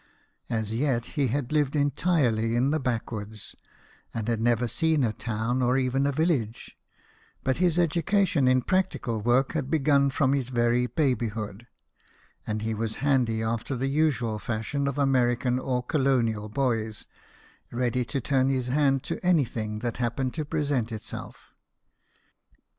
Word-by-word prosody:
As 110 Hz, -2 st, -2 dB
yet 120 Hz, -1 st, 0 dB
he 145 Hz, -4 st, +1 dB
had 125 Hz, +1 st, -2 dB
lived 150 Hz, -2 st, +1 dB
entirely 140 Hz, -6 st, +1 dB
in 130 Hz, +4 st, +2 dB
the 155 Hz, -, +1 dB
backwoods, 110 Hz, -4 st, -4 dB, 0.6 s
and 115 Hz, -1 st, -3 dB
had 115 Hz, -2 st, 0 dB
never 120 Hz, +1 st, +2 dB
seen 160 Hz, +3 st, +1 dB
a 110 Hz, -3 st, +1 dB
town 115 Hz, +2 st, -2 dB
or 125 Hz, +1 st, +2 dB
even 135 Hz, +1 st, +1 dB
a -, -, +1 dB
village; 140 Hz, -7 st, -1 dB, 0.7 s
but 130 Hz, -, 0 dB
his 175 Hz, -1 st, +2 dB
education 175 Hz, -2 st, +2 dB
in 130 Hz, 0 st, +3 dB
practical 185 Hz, -, 0 dB
work 120 Hz, +4 st, +2 dB
had 145 Hz, -5 st, -2 dB
begun 140 Hz, -2 st, +3 dB
from 135 Hz, 0 st, +1 dB
his 135 Hz, -3 st, -1 dB
very 120 Hz, 0 st, +2 dB
babyhood, 115 Hz, -, -2 dB, 0.8 s
and 110 Hz, 0 st, -2 dB
he 110 Hz, 0 st, -1 dB
was 110 Hz, 0 st, -2 dB
handy 120 Hz, -6 st, +2 dB
after 115 Hz, +4 st, -2 dB
the 130 Hz, +2 st, -2 dB
usual 135 Hz, -7 st, +1 dB
fashion 120 Hz, +7 st, -2 dB
of 140 Hz, 0 st, -2 dB
American 125 Hz, -2 st, +2 dB
or 125 Hz, -1 st, -1 dB
colonial 125 Hz, -7 st, +1 dB
boys 110 Hz, -3 st, -1 dB, 0.7 s
ready 125 Hz, +1 st, 0 dB
to 120 Hz, +4 st, -3 dB
turn 135 Hz, +1 st, +1 dB
his 130 Hz, -2 st, -1 dB
hand 135 Hz, -1 st, +2 dB
to -, -, -4 dB
anything 120 Hz, -11 st, +1 dB
that 120 Hz, -1 st, -3 dB
happened 125 Hz, +2 st, -1 dB
to 155 Hz, -, -2 dB
present 145 Hz, -6 st, -1 dB
itself. 110 Hz, -1 st, -8 dB
125 Hz, 145 wpm, -27 LUFS, 115-140 Hz, 0.8 s, in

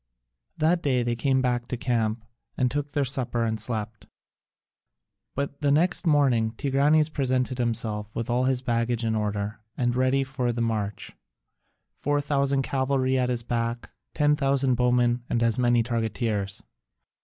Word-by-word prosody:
That 165 Hz, +2 st, +2 dB
day 130 Hz, -5 st, +1 dB
they 120 Hz, 0 st, -1 dB
came 130 Hz, +2 st, +1 dB
back 120 Hz, -1 st, 0 dB
to 125 Hz, -, -3 dB
camp 115 Hz, -2 st, -1 dB, 0.3 s
and 125 Hz, -1 st, +1 dB
took 145 Hz, 0 st, -3 dB
their 145 Hz, -2 st, +1 dB
supper 125 Hz, -3 st, -1 dB
and 110 Hz, -1 st, -1 dB
slept. 110 Hz, -2 st, -4 dB, 1.3 s
But 140 Hz, +1 st, -4 dB
the 145 Hz, -, +2 dB
next 175 Hz, +5 st, +2 dB
morning 130 Hz, -7 st, +3 dB
Tigranes 145 Hz, +5 st, +2 dB
presented 130 Hz, -4 st, -1 dB
himself 110 Hz, -3 st, -1 dB
with 115 Hz, -, -3 dB
all 125 Hz, +1 st, +1 dB
his 130 Hz, -1 st, 0 dB
baggage 115 Hz, -1 st, 0 dB
in 110 Hz, -, 0 dB
order 105 Hz, 0 st, -2 dB, 0.2 s
and 120 Hz, -1 st, 0 dB
ready 130 Hz, +2 st, +2 dB
for 130 Hz, -2 st, -2 dB
the 120 Hz, -, -4 dB
march, 110 Hz, -3 st, -2 dB, 0.8 s
4000 140 Hz, -1 st, 0 dB
cavalry 130 Hz, -1 st, 0 dB
at 125 Hz, -1 st, +1 dB
his 120 Hz, -2 st, -1 dB
back, 115 Hz, 0 st, -3 dB, 0.2 s
10,000 140 Hz, -3 st, +2 dB
bowmen, 125 Hz, 0 st, +2 dB
and 115 Hz, -, +1 dB
as 115 Hz, 0 st, +2 dB
many 120 Hz, -1 st, +3 dB
targeteers. 110 Hz, -3 st, -2 dB
125 Hz, 145 wpm, -26 LUFS, 115-135 Hz, 1.3 s, morning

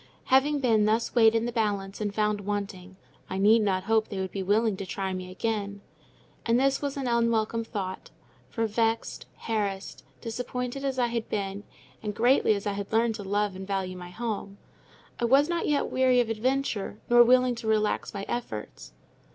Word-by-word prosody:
Having 285 Hz, +2 st, +4 dB
been 220 Hz, -5 st, +3 dB
thus 220 Hz, +2 st, +1 dB
weighed 225 Hz, -2 st, +5 dB
in 225 Hz, 0 st, +1 dB
the 240 Hz, -, -2 dB
balance 205 Hz, -3 st, -2 dB
and 205 Hz, -1 st, -1 dB
found 210 Hz, 0 st, 0 dB
wanting, 195 Hz, -2 st, -4 dB, 0.3 s
I 190 Hz, -, -3 dB
need 215 Hz, +4 st, +5 dB
not 190 Hz, -3 st, 0 dB
hope 220 Hz, +1 st, +2 dB
they 200 Hz, -, -6 dB
would 190 Hz, -1 st, -3 dB
be 195 Hz, -, -3 dB
willing 210 Hz, +2 st, +2 dB
to 195 Hz, -, -5 dB
try 190 Hz, 0 st, -3 dB
me 185 Hz, 0 st, -5 dB
again. 200 Hz, 0 st, -3 dB, 0.6 s
And 235 Hz, +1 st, +2 dB
this 275 Hz, +1 st, +2 dB
was 280 Hz, -1 st, -3 dB
an 275 Hz, -, -3 dB
unwelcome 230 Hz, -1 st, +1 dB
thought; 190 Hz, -4 st, -5 dB, 0.4 s
for 225 Hz, -, -1 dB
vexed, 225 Hz, +1 st, -1 dB
harassed, 205 Hz, -4 st, -3 dB, 0.2 s
disappointed 250 Hz, +3 st, -4 dB
as 270 Hz, -1 st, -1 dB
I 245 Hz, -, +3 dB
had 235 Hz, -1 st, -3 dB
been, 200 Hz, 0 st, -3 dB, 0.4 s
and 210 Hz, -1 st, -4 dB
greatly 240 Hz, -1 st, +4 dB
as 200 Hz, -, -5 dB
I 205 Hz, -, 0 dB
had 200 Hz, 0 st, -5 dB
learned 225 Hz, +1 st, +2 dB
to 215 Hz, -2 st, -7 dB
love 205 Hz, 0 st, 0 dB
and 190 Hz, 0 st, -7 dB
value 190 Hz, -2 st, -2 dB
my 180 Hz, -1 st, -8 dB
home, 200 Hz, -1 st, -5 dB, 0.6 s
I 235 Hz, -, +1 dB
was 275 Hz, +5 st, +5 dB
not 340 Hz, 0 st, -1 dB
yet 290 Hz, -1 st, 0 dB
weary 255 Hz, -1 st, +3 dB
of 240 Hz, -2 st, +1 dB
adventure, 230 Hz, -3 st, -1 dB
nor 240 Hz, 0 st, +7 dB
willing 250 Hz, +1 st, +4 dB
to 230 Hz, -1 st, -7 dB
relax 215 Hz, -1 st, +1 dB
my 200 Hz, -1 st, -5 dB
efforts. 110 Hz, -, -5 dB
220 Hz, 190 wpm, -27 LUFS, 200-240 Hz, 0.6 s, nor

